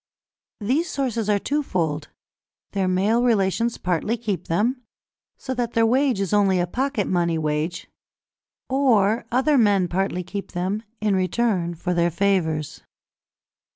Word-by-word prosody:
These 275 - 0
sources 235 -6 -2
are 205 - +4
twofold: 180 - -1 0.6
their 195 -2 0
male 200 +6 +2
relations 230 0 +1
partly 185 +6 -1
keep 210 -5 -3
them, 235 +10 0 0.6
so 260 - -4
that 240 -2 -2
their 230 0 +3
wage 255 -1 +2
is 195 0 -1
only 195 -3 +3
a 175 - +2
pocket 250 +2 -1
money 170 -2 +1
wage; 155 +3 -2 0.8
or 240 -5 +2
other 265 +3 +3
men 200 -5 +3
partly 180 0 -1
keep 200 +3 -7
them, 190 +4 -2 0.2
in 210 -2 +2
return 185 -2 0
for 180 +2 -2
their 170 0 +2
favours. 170 -4 0
200 Hz, 135 wpm, -23 LUFS, 180-235 Hz, 0.8 s, are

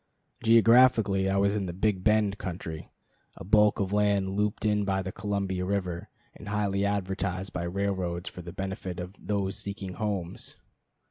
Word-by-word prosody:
Geographically 115 -4 +5
I 95 - +1
was 100 +1 +3
in 100 -3 -1
the 85 - -4
"Big 95 0 0
Bend" 105 -1 +2
country, 85 -4 -6 0.5
a - - -9
bulk 105 +3 +4
of 100 -1 -1
land 100 -2 +2
looped 105 +2 -1
in 105 -1 +2
by 95 -1 0
the 95 - -4
Columbia 100 -2 -2
River, 90 -3 -2 0.2
and 105 - -12
highly 100 -1 0
advertised 95 -1 -2
by 85 - -2
railroads 90 -2 -2
for 90 - -7
the 85 0 -8
benefit 95 -1 -5
of 90 +2 -6
"those 100 -2 -2
seeking 100 -2 -5
homes." 100 -5 -4
100 Hz, 160 wpm, -28 LUFS, 95-105 Hz, 0.5 s, Geographically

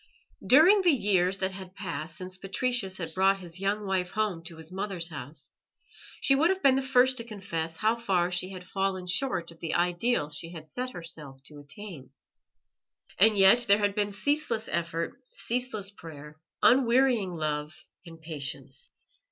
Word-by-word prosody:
During 345 +10 +6
the 360 - +4
years 195 - +2
that 190 0 -1
had 190 0 -10
passed 165 -5 -5
since 185 0 -7
Patricius 195 +1 -1
had 165 -3 -5
brought 195 +2 +3
his 175 -1 -7
young 200 +2 -1
wife 190 -2 0
home 205 -6 -2
to 165 -1 -7
his 160 +1 -8
mother's 185 -3 -2
house, 145 -1 -8 0.7
she 275 - +4
would 305 +5 +4
have 380 0 -1
been 275 -1 +6
the 270 - +1
first 260 -1 +3
to 230 - -3
confess 170 -7 -4
how 220 +6 +2
far 185 -6 0
she 180 +1 -1
had 185 -2 -9
fallen 190 -1 -2
short 180 -3 -1
of 165 - -16
the 165 - -3
ideal 175 -1 +1
she 165 +4 -7
had 160 -2 -9
set 250 +10 -4
herself 150 -6 -8
to 145 +2 -12
attain. 150 0 -9 1.1
And 215 +2 +6
yet 195 +5 +6
there 200 - +6
had 205 -1 +1
been 205 0 -1
ceaseless 235 0 -1
effort, 170 +6 -3
ceaseless 230 -5 -3
prayer, 155 -5 -11 0.2
unwearying 245 -6 +4
love 150 0 -3 0.3
and 165 -2 -12
patience. 155 - -6
190 Hz, 170 wpm, -28 LUFS, 165-220 Hz, 1.1 s, During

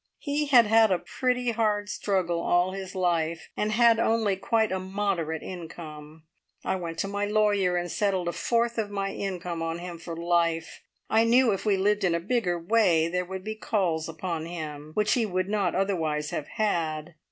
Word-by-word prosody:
He 295 0 -1
had 250 -4 +7
had 220 0 +5
a 185 - +3
pretty 250 +5 -1
hard 210 -2 0
struggle 185 -5 -1
all 175 +2 +2
his 195 0 -7
life, 170 -3 0
and 210 0 -1
had 230 0 +5
only 225 -3 +2
quite 220 +3 +1
a 190 - -1
moderate 185 -5 -2
income. 160 -3 -9 0.4
I - - +1
went 170 -2 -5
to 195 - -2
my 200 +1 -2
lawyer 205 -3 +2
and 175 0 -3
settled 190 -4 0
a - - +1
fourth 235 0 0
of 210 -2 -1
my 195 -1 -2
income 180 -3 -4
on 165 0 -2
him 175 -1 -7
for 165 0 -7
life. 170 -1 0 0.3
I 220 +1 +4
knew 240 +1 +4
if 195 +2 -3
we 200 -2 +3
lived 205 +2 +1
in 175 -3 +2
a - - 0
bigger 185 -2 0
way 170 -3 +3
there 180 +1 -1
would 190 +1 -6
be 215 - -3
calls 180 -7 -1
upon 165 0 -4
him 155 -3 -6
which 210 0 +2
he 245 - +2
would 185 0 -1
not 200 -4 0
otherwise 160 -6 -1
have 145 - -4
had. 170 -6 -1
185 Hz, 190 wpm, -27 LUFS, 170-215 Hz, 0.4 s, had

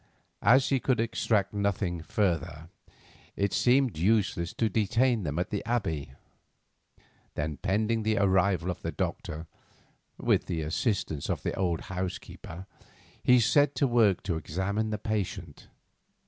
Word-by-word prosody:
As 130 +3 +5
he 135 - +2
could 125 -2 +1
extract 110 -3 0
nothing 100 -4 -1
further, 80 -4 -1 0.7
it 100 0 0
seemed 125 - +3
useless 95 -3 +1
to 115 - +1
detain 115 +3 +2
them 75 -3 -3
at 90 - -2
the 105 - -2
Abbey. 80 - -2 1.2
Then, 75 0 -3
pending 110 +3 0
the 110 0 +1
arrival 95 -2 +2
of 90 - -8
the - - -3
doctor, 80 +2 -4 0.7
with - - +1
the 80 -2 -2
assistance 80 - -1
of - - -2
the - - -1
old 90 -3 -1
housekeeper, 90 -1 -6 0.6
he 125 0 +5
set 145 +5 +3
to 140 - +2
work 115 -7 +3
to 85 -4 -1
examine 100 +7 -2
the 105 - -2
patient. 105 -2 -4
100 Hz, 135 wpm, -28 LUFS, 85-115 Hz, 1.2 s, As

